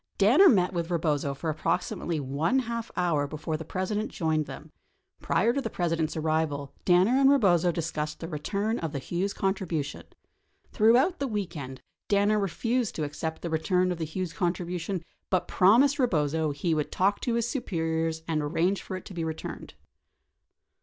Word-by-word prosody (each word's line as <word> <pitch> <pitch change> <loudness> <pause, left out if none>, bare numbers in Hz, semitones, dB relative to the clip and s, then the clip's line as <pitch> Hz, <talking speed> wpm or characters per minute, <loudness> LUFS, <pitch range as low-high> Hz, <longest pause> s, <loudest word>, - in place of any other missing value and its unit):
Danner 265 - +7
met 185 -4 +3
with 170 -1 -2
Eebozo 150 -5 0
for 160 +2 -2
approximately 165 +1 -1
one 145 - 0
half 235 -2 -2
hour 165 -5 +1
before 155 +2 -4
the 160 - -5
President 195 +6 -2
joined 155 -3 0
them. - - -9 0.5
Prior 220 +8 +2
to 275 - -1
the - - -3
President's 165 -3 -1
arrival, 155 -3 -1
Danner 190 +9 +4
and 270 - +6
Eebozo 185 - +4
discussed 155 -2 -3
the 165 - -5
return 200 +8 -2
of 165 -2 -4
the - - -2
Hughes 175 +8 -2
contribu 190 -7 -1
tion. 140 - -9 0.7
Throughout 245 - +4
the 275 - -1
weekend, 170 - -5 0.2
Danner 205 +1 +3
refused 230 +4 -1
to 155 - -2
accept 160 +2 -4
the 170 - -3
return 180 +3 +1
of 175 - -4
the 160 - -1
Hughes 170 +2 -4
contribution 175 0 -2 0.2
but 185 -2 +1
promised 250 +10 +4
Eebozo 160 - +1
he 145 +4 -1
would 150 -2 -1
talk 195 +2 +1
to 235 - -1
his 235 0 0
superiors 165 - -2
and 160 -2 0
arrange 170 +6 0
for 185 - -6
it 185 - -11
to - - -9
be 170 -2 -3
returned. 160 -1 -6
175 Hz, 170 wpm, -27 LUFS, 160-205 Hz, 0.7 s, Danner